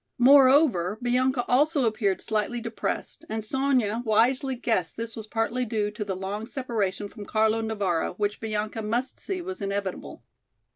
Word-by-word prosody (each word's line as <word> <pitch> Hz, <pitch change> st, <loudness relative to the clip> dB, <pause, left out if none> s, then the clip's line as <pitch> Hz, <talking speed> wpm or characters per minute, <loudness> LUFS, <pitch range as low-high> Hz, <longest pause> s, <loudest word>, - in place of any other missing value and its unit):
Moreover, 260 Hz, -, +5 dB
Bianca 250 Hz, +1 st, +1 dB
also 285 Hz, +2 st, +3 dB
appeared 215 Hz, -4 st, 0 dB
slightly 220 Hz, +3 st, 0 dB
depressed 230 Hz, +6 st, -4 dB
and 220 Hz, 0 st, -3 dB
Sonya 250 Hz, -3 st, +1 dB
wisely 250 Hz, +4 st, +2 dB
guessed 225 Hz, -8 st, -1 dB
this 230 Hz, 0 st, -5 dB
was 220 Hz, -1 st, -7 dB
partly 230 Hz, +3 st, -1 dB
due 215 Hz, -3 st, -1 dB
to 210 Hz, 0 st, -4 dB
the 195 Hz, -2 st, -3 dB
long 200 Hz, +4 st, -4 dB
separation 220 Hz, -7 st, -2 dB
from 210 Hz, +1 st, -10 dB
Carlo 220 Hz, +2 st, +1 dB
Navara, 200 Hz, -7 st, -1 dB
which 205 Hz, 0 st, -1 dB
Bianca 215 Hz, 0 st, -3 dB
must 235 Hz, +5 st, -2 dB
see 370 Hz, -2 st, -4 dB
was 370 Hz, +1 st, -6 dB
inevitable. 200 Hz, -1 st, -4 dB
225 Hz, 150 wpm, -26 LUFS, 210-255 Hz, -, Moreover